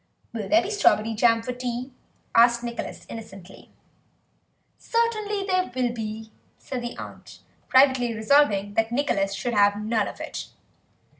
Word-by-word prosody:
"Will 215 Hz, -4 st, -5 dB
there 330 Hz, +2 st, +5 dB
be 390 Hz, -, -4 dB
strawberry 225 Hz, -, +2 dB
jam 230 Hz, +1 st, +3 dB
for 250 Hz, -, -4 dB
tea?" 250 Hz, +1 st, -4 dB, 0.4 s
asked 235 Hz, +1 st, +5 dB
Nicholas 235 Hz, -1 st, -6 dB
innocently. 195 Hz, -4 st, -11 dB, 1.1 s
"Certainly 430 Hz, -4 st, -1 dB
there 370 Hz, -7 st, 0 dB
will 245 Hz, -2 st, 0 dB
be," 220 Hz, -1 st, -6 dB, 0.3 s
said 255 Hz, -2 st, -6 dB
the 240 Hz, 0 st, -6 dB
aunt, -, -, -10 dB, 0.3 s
privately 260 Hz, -2 st, +4 dB
resolving 220 Hz, -3 st, +2 dB
that 225 Hz, +2 st, 0 dB
Nicholas 200 Hz, -7 st, 0 dB
should 235 Hz, +5 st, -3 dB
have 205 Hz, -1 st, +3 dB
none 215 Hz, 0 st, 0 dB
of -, -, -9 dB
it. -, -, -6 dB
235 Hz, 140 wpm, -25 LUFS, 215-270 Hz, 1.1 s, there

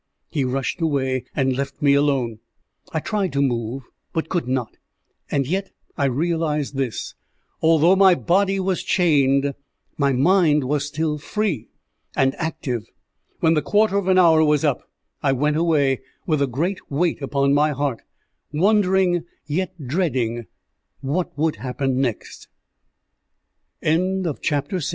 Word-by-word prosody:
He 145 Hz, -, 0 dB
rushed 130 Hz, +5 st, -2 dB
away, 130 Hz, -5 st, 0 dB
and 130 Hz, -2 st, +1 dB
left 140 Hz, +1 st, -4 dB
me 145 Hz, -2 st, +4 dB
alone. 135 Hz, -6 st, +1 dB, 0.5 s
I 160 Hz, -, -1 dB
tried 200 Hz, +1 st, -1 dB
to 140 Hz, -, +1 dB
move, 120 Hz, 0 st, -2 dB, 0.3 s
but 160 Hz, -, -2 dB
could 175 Hz, -7 st, -1 dB
not; 125 Hz, -3 st, -2 dB, 0.5 s
and 140 Hz, -1 st, 0 dB
yet 190 Hz, +7 st, -2 dB, 0.3 s
I 140 Hz, -, 0 dB
realized 150 Hz, +1 st, -1 dB
this 135 Hz, -4 st, -3 dB, 0.5 s
although 165 Hz, +3 st, +5 dB
my 190 Hz, -2 st, +6 dB
body 195 Hz, +3 st, +1 dB
was 190 Hz, -1 st, 0 dB
chained, 140 Hz, -5 st, +2 dB, 0.5 s
my 140 Hz, -1 st, +3 dB
mind 150 Hz, +2 st, +3 dB
was 145 Hz, +2 st, -1 dB
still 150 Hz, +1 st, -2 dB
free 190 Hz, -, -2 dB, 0.5 s
and 135 Hz, 0 st, +2 dB
active. 160 Hz, -8 st, -3 dB, 0.5 s
When 160 Hz, -, +4 dB
the 155 Hz, -, +2 dB
quarter 205 Hz, +6 st, +2 dB
of 200 Hz, -2 st, 0 dB
an 185 Hz, -1 st, +4 dB
hour 165 Hz, -3 st, +6 dB
was 150 Hz, -1 st, +2 dB
up, 145 Hz, -4 st, -1 dB, 0.3 s
I 135 Hz, -2 st, +2 dB
went 150 Hz, +3 st, +1 dB
away, 150 Hz, -6 st, +2 dB, 0.2 s
with 155 Hz, -4 st, +1 dB
a 140 Hz, -, +2 dB
great 165 Hz, +10 st, -2 dB
weight 160 Hz, +3 st, 0 dB
upon 140 Hz, 0 st, +1 dB
my 150 Hz, +2 st, +3 dB
heart, 140 Hz, -4 st, -2 dB, 0.5 s
wondering, 185 Hz, 0 st, +2 dB, 0.2 s
yet 180 Hz, +4 st, -2 dB
dreading, 125 Hz, -, -1 dB, 0.5 s
what 150 Hz, +5 st, -2 dB
would 155 Hz, +1 st, 0 dB
happen 130 Hz, 0 st, -1 dB
next. 120 Hz, -5 st, -4 dB, 1.4 s
CHAPTER 185 Hz, +3 st, +1 dB
VII -, -, -10 dB
DREARWATE 150 Hz, +3 st, -1 dB
150 Hz, 140 wpm, -22 LUFS, 135-175 Hz, 1.4 s, my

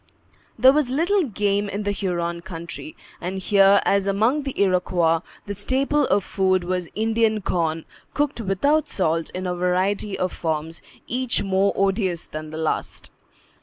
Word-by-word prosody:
There 260 Hz, +1 st, +7 dB
was 295 Hz, -3 st, +1 dB
little 345 Hz, +7 st, +2 dB
game 205 Hz, -3 st, 0 dB
in 200 Hz, +2 st, -3 dB
the 205 Hz, -, 0 dB
Huron 170 Hz, -3 st, -2 dB
country; 170 Hz, -3 st, -8 dB, 0.3 s
and 185 Hz, +2 st, -3 dB
here, 195 Hz, +1 st, +5 dB
as 200 Hz, 0 st, +2 dB
among 220 Hz, +9 st, +2 dB
the 275 Hz, -2 st, -5 dB
Iroquois, 180 Hz, -3 st, +2 dB, 0.3 s
the 205 Hz, -, -4 dB
staple 270 Hz, +7 st, +1 dB
of 200 Hz, 0 st, +2 dB
food 185 Hz, -2 st, +1 dB
was 180 Hz, -1 st, -2 dB
Indian 220 Hz, 0 st, +1 dB
corn, 165 Hz, -4 st, -1 dB, 0.3 s
cooked 290 Hz, -4 st, 0 dB
without 280 Hz, +10 st, +1 dB
salt 165 Hz, -3 st, 0 dB
in 185 Hz, 0 st, -3 dB
a 180 Hz, -, -1 dB
variety 185 Hz, +3 st, 0 dB
of 185 Hz, -1 st, -1 dB
forms, 160 Hz, 0 st, -3 dB, 0.2 s
each 250 Hz, -1 st, -1 dB
more 195 Hz, 0 st, +2 dB
odious 195 Hz, -3 st, 0 dB
than 155 Hz, 0 st, -7 dB
the 155 Hz, -, -7 dB
last. 160 Hz, -1 st, -3 dB
195 Hz, 155 wpm, -23 LUFS, 175-220 Hz, 0.3 s, There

